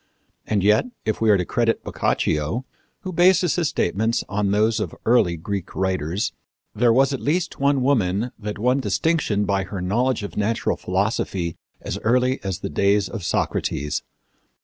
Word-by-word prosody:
And 105 -3 +1
yet, 105 +1 +4 0.2
if 110 - -1
we 110 - +3
are 105 - +6
to 90 - -1
credit 115 +2 0
Boccaccio, 75 - -1 0.4
who 185 - -5
bases 180 0 +4
his 165 -5 +1
statements 110 +6 0
on 100 0 -1
those 110 +3 +2
of 105 - -4
early 100 -8 +3
Greek 95 +2 -5
writers, 95 0 -1 0.4
there 115 +2 +3
was 135 +4 +3
at 135 - -2
least 175 +4 -1
one 140 -1 +2
woman 115 -4 +1
that 105 -1 -5
won 125 +5 +2
distinction 135 -8 0
by 100 0 0
her 95 +1 -6
knowledge 115 +6 0
of 100 - -6
natural 110 +2 0
philosophy 95 -3 -1 0.3
as - - -4
early 125 +3 +1
as 95 -3 -3
the - - -3
days 100 +5 +2
of 110 -5 -6
Socrates. 75 -3 -1
105 Hz, 165 wpm, -22 LUFS, 95-125 Hz, 0.4 s, are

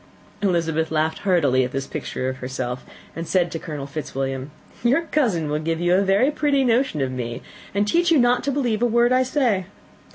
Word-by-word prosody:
Elizabeth 165 -4 +1
laughed 160 0 0
heartily 145 -10 +2
at 125 - -3
this 135 0 -3
picture 130 - -4
of 130 0 -3
herself, 125 -1 -4 0.3
and 165 0 -5
said 175 -3 +1
to 165 - -4
Colonel 150 -5 -6
Fitzwilliam, 135 -2 -4 0.3
"Your 265 +8 +3
cousin 235 - 0
will 150 +1 -1
give 165 +1 -2
you 175 +1 +2
a 190 - +4
very 200 +8 +3
pretty 290 -2 +1
notion 240 - +1
of 130 -1 -1
me, 120 -2 -5 0.3
and 205 +1 +2
teach 345 +9 +2
you 330 - +5
not 245 -1 +3
to 280 - +1
believe 245 -6 0
a 245 - +4
word 235 +1 +3
I 255 - +4
say. 255 -8 +1
175 Hz, 200 wpm, -22 LUFS, 145-245 Hz, 0.3 s, you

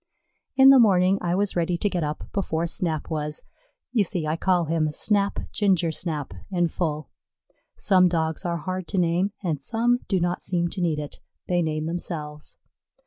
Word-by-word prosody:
In 265 0 +8
the 270 - +7
morning 195 -3 +4
I 175 0 0
was 200 +1 -1
ready 175 0 0
to 205 - 0
get 180 -4 -1
up 150 0 -3
before 170 -4 -1
Snap 165 -2 -2
was. 150 -1 -3 0.5
You 230 -4 +3
see, 175 -3 -3
I 155 +1 0
call 175 0 +1
him 155 -1 0
Snap 200 +5 +1
Ginger 185 -5 +2
snap 155 - -3 0.2
in 175 -2 +1
full. 155 -4 -3 0.7
Some 185 -3 +4
Dogs 160 -2 -1
are 170 -1 -1
hard 185 +2 -4
to 200 - -3
name, 180 +3 +1
and 155 -6 -1
some 240 - +1
do 190 - +1
not 175 +1 -1
seem 175 -2 0
to 185 - -5
need 165 -3 +1
it 150 -1 -6 0.3
they 175 -1 +1
name 155 -1 -2
themselves. 155 -3 -5
175 Hz, 180 wpm, -25 LUFS, 160-190 Hz, 0.7 s, In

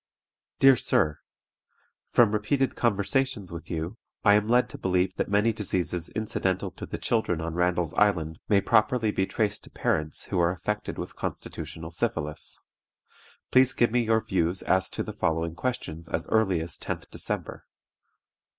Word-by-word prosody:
"DEAR 135 -1 +7
SIR, 75 -9 +1 0.9
From 115 -4 +5
repeated 130 +6 +1
conversations 115 -1 0
with 85 -1 -8
you, 85 +7 -4 0.3
I 105 - +7
am 105 0 +3
led 120 +2 +4
to - - -9
believe 90 0 +1
that - - -1
many 105 +3 +3
diseases 90 -5 -2
incidental 95 -3 -1
to - - -8
the - - -4
children 110 -8 0
on 80 0 -3
Randall's 90 -1 +1
Island 85 -6 +2
may 100 -2 +5
properly 110 +1 +3
be 95 -2 0
traced 105 -2 -1
to - - -13
parents 75 -1 -1
who 90 - -2
are 85 0 +4
affected 105 +4 -3
with - - -6
constitutional 80 +1 -6
syphilis. 75 -2 -2 0.9
Please 130 0 +5
give 120 -2 +2
me 125 +1 +3
your 110 -1 +2
views 90 -2 0
as 95 -1 +2
to - - -3
the - - -6
following 80 0 0
questions 85 -7 -4
as 80 - -2
early 95 -7 +2
as 80 -1 -6
10th - - -5
December. - - -4
95 Hz, 160 wpm, -27 LUFS, 85-110 Hz, 0.9 s, DEAR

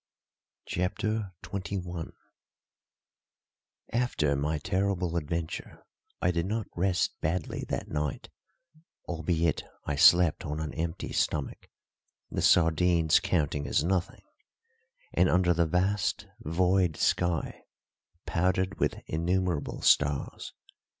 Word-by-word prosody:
CHAPTER 100 +3 -2
XXI 90 -4 -5 1.8
After 115 - +1
my 75 +3 -1
terrible 95 +1 -1
adventure 85 0 -4 0.3
I 90 - +2
did 85 0 -1
not 110 +1 -2
rest 90 +1 +1
badly 80 +1 -2
that - - -3
night, 75 -2 -3 0.8
albeit 80 -1 0 0.2
I 75 - -1
slept 90 0 +6
on 75 -2 -4
an 80 -1 -4
empty 80 +1 -4
stomach 75 -3 -1 0.6
(the - - -2
sardines 85 -1 +4
counting 75 -6 0
as - - +2
nothing), 90 +1 -1 0.9
and - - +4
under 90 -1 +3
the 85 -1 +2
vast, 95 +4 0
void 90 +1 +1
sky, 85 -2 0 0.6
powdered 95 +2 0
with - - -1
innumerable 85 0 -1
stars. 70 -2 +2
85 Hz, 100 wpm, -29 LUFS, 80-95 Hz, 1.8 s, slept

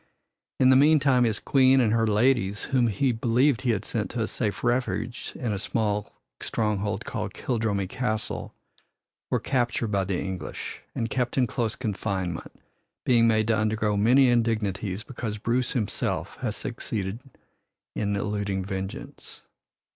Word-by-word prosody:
In 130 0 +6
the - - +7
meantime 140 -3 +5
his 110 -2 +1
Queen 135 -1 +4
and 115 -4 +3
her 115 -1 +2
ladies, 105 -2 +2
whom 125 -3 +2
he 125 +5 +1
believed 120 +3 +2
he 130 - -1
had 110 -5 0
sent - - -2
to - - -3
a - - 0
safe 105 - -2
refuge 120 0 -1
in 115 -4 -2
a 100 - -2
stronghold 105 0 -2
called 105 -8 -4
Kildrummy 110 -6 -1
Castle, 110 -1 -3 0.8
were - - +1
captured 120 -3 0
by 100 -2 +1
the 95 -2 -1
English 95 -5 -5
and 115 - -1
kept 125 -1 -1
in 130 - +4
close 115 -2 -2
confinement, 95 -6 -3 0.5
being 115 -2 +5
made 110 -1 +3
to 115 - +4
undergo 110 -1 +1
many 125 +6 +5
indignities 110 -4 0
because 115 -5 -5
Bruce 120 +3 0
himself 110 -5 -2
had - - -3
succeeded 100 0 -4 0.8
in 100 -1 0
eluding 100 -2 -2
vengeance. 95 0 -7
110 Hz, 145 wpm, -26 LUFS, 100-125 Hz, 0.8 s, the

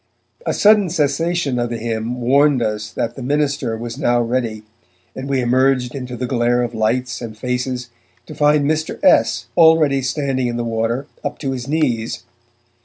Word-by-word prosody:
A - - +1
sudden 210 -3 +5
cessation 155 -3 0
of 120 0 -1
the 120 - -3
hymn 115 +2 -3
warned 135 +1 +3
us 105 -1 -3
that 115 - -3
to - - -6
Minister 140 -3 -1
was 120 +3 -6
now 120 -4 +2
ready, 115 -2 -2 0.5
and 135 +1 -6
we 135 -2 +1
emerged 125 0 +2
into 125 -2 -6
the 125 - -2
glare 120 0 +1
of 120 - -4
lights 120 +3 -1
and 110 -2 -7
faces 125 +1 -3 0.3
to - - -9
find 150 0 +3
Mr. 155 +1 -1
S. 120 +1 +4
already 160 -4 +5
standing 130 -1 -1
in 120 0 -3
the 120 - -2
water 115 +3 -1 0.2
up - - -3
to 135 -3 -3
his 130 -1 -5
knees. 130 -7 -1
125 Hz, 175 wpm, -19 LUFS, 120-140 Hz, 0.5 s, sudden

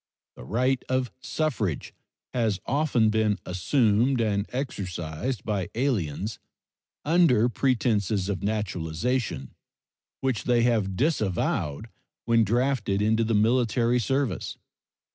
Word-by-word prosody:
The - - -11
right 125 - 0
of 130 -1 0
suffrage 115 - -2 0.4
has 110 -6 0
often 130 -6 +2
been 110 -2 +2
assumed 115 +6 +2
and 105 -2 0
exercised 100 - -4
by 100 -5 -1
aliens 105 - -1 0.7
under 155 -8 +4
pretenses 110 -6 +1
of 95 -3 -2
naturalization, 100 - -2 0.7
which 130 -5 -1
they 120 -1 +3
have 110 -6 +1
disavowed 110 - 0 0.4
when 115 -1 +4
drafted 115 -2 +1
into 110 +2 +2
the 115 0 +1
military 120 +2 +2
service. 135 -3 -1
110 Hz, 105 wpm, -26 LUFS, 100-125 Hz, 0.7 s, under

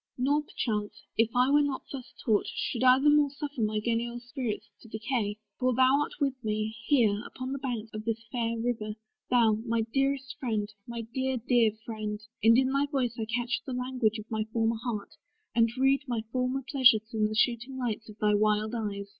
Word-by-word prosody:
Nor, 280 +4 +2
perchance, 210 -7 -3
If 225 0 +3
I 250 +2 +4
were 295 +1 +6
not 285 -2 -1
thus 265 -3 -7
taught, 215 -4 +2
should 245 0 -2
I 255 0 +7
the 295 +2 +4
more 295 -1 +4
Suffer 285 -2 -5
my 215 0 +1
genial 235 +2 -1
spirits 240 -4 -4
to - - -14
decay: 220 -1 -2 0.2
For 255 -1 +2
thou 260 +2 +5
art - - -2
with 280 -3 +1
me, 215 0 -1
here, 220 -7 +3
upon 255 +2 -6
the 275 - -3
banks 235 -5 -4
Of 215 0 -6
this 225 0 -2
fair 230 -1 -1
river; 225 -2 -2 0.3
thou, 225 -4 +4
my 230 -1 0
dearest 270 -1 0
Friend, 220 -5 -1 0.2
My 235 -1 -4
dear, 260 0 0
dear 235 -2 +3
Friend, 215 -2 -4 0.2
and 230 +1 +7
in 260 0 +2
thy 280 +1 +2
voice 260 -5 0
I 220 - -1
catch 240 +2 -1
The 265 - -5
language 250 -3 0
of 215 - -7
my 220 -1 0
former 225 0 +1
heart, 215 -5 -4 0.4
and 230 0 +4
read 270 +1 +4
My 235 -3 -1
former 255 +2 -1
pleasures 235 -6 +4
in 215 -1 +2
the 215 - -4
shooting 240 +3 +1
lights 225 -3 -3
Of 210 - -11
thy 210 -1 +2
wild 215 +1 +2
eyes. 200 -3 -3
235 Hz, 200 wpm, -29 LUFS, 215-260 Hz, 0.4 s, I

